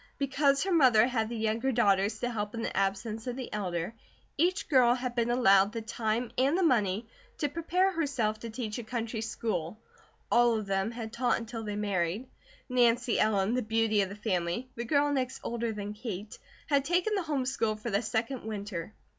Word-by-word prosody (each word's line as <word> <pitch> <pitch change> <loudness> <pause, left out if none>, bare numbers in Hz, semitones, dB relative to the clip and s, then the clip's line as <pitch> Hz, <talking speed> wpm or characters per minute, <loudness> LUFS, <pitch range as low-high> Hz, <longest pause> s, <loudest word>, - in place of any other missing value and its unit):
Because 275 0 +2
her 385 - -1
mother 250 -9 +6
had 225 -3 -1
the 235 - -4
younger 225 +4 0
daughters 200 -4 +2
to 245 - -1
help 210 -1 -3
in 230 - -3
the - - -3
absence 200 +4 -1
of 245 - -2
the 255 -2 -6
elder, 180 -2 -2 0.4
each 350 +5 +1
girl 250 -5 +5
had 250 -1 -3
been 235 -1 0
allowed 200 -4 +4
the 230 - -3
time 225 +1 -2
and 325 +7 +3
money 215 -4 +1 0.3
to 295 - 0
prepare 335 +5 +1
herself 260 - -1
to 230 - -6
teach 220 -1 -4
a - - -5
country 225 0 -3
school; 215 -4 -3 0.5
all 240 -1 +4
of 215 - -4
them 195 +1 0
had 230 -1 -6
taught 245 +1 +1
until 230 -1 -6
they 210 -1 -4
married. 200 +2 -1 0.4
Nancy 240 -1 +2
Ellen, 215 0 +2
the 250 - +1
beauty 220 -1 +2
of 195 - -1
the 200 - -7
family, 205 +3 -2
the 235 - -5
girl 290 +3 +2
next 255 -2 -1
older 235 -1 -2
than 205 -1 -5
Kate, 210 -2 -6 0.3
had 280 -3 +2
taken 355 +7 +1
the 400 - +1
home 295 -6 -1
school 225 -5 0
for 215 +2 -5
the 200 +2 +2
second 230 +4 -2
winter. 205 -3 -5
230 Hz, 195 wpm, -30 LUFS, 210-255 Hz, 0.5 s, mother